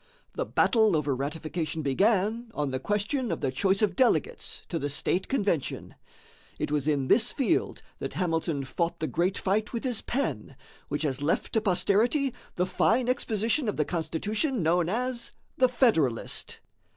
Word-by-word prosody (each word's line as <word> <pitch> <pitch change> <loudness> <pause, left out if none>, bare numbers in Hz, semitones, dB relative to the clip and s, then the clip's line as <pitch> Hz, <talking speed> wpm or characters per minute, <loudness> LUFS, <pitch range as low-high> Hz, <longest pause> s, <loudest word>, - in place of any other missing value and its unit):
The - - -3
battle 220 -6 +3
over 145 -3 0
ratification 155 +3 -3
began 210 - +1
on 145 -2 -1
the 130 - -2
question 210 - -1
of 165 - -3
the 130 - 0
choice 195 +9 +2
of 210 - +1
delegates 260 -2 +1
to 165 - -2
the 145 - -2
state 165 +5 0
convention. 200 - -1 0.6
It - - -3
was 150 -1 0
in 140 -3 +1
this 235 - +4
field 285 +4 0 0.2
that - - -4
Hamilton 165 -5 -1
fought 170 +5 -2
the 155 - -1
great 180 +4 0
fight 210 +4 0
with 230 - -3
his 245 -5 0
pen 275 +3 -3 0.3
which - - -2
has 140 -2 -1
left 150 +3 0
to 220 - +2
posterity 225 - +2 0.2
the 180 - +1
fine 225 +6 +2
exposition 230 0 +1
of - - -3
the 150 - +2
Constitution 205 - -1
known 170 +1 +2
as 240 +3 -1 0.3
"The 255 -1 +5
Federalist." 165 - +1
190 Hz, 165 wpm, -28 LUFS, 155-235 Hz, 0.6 s, The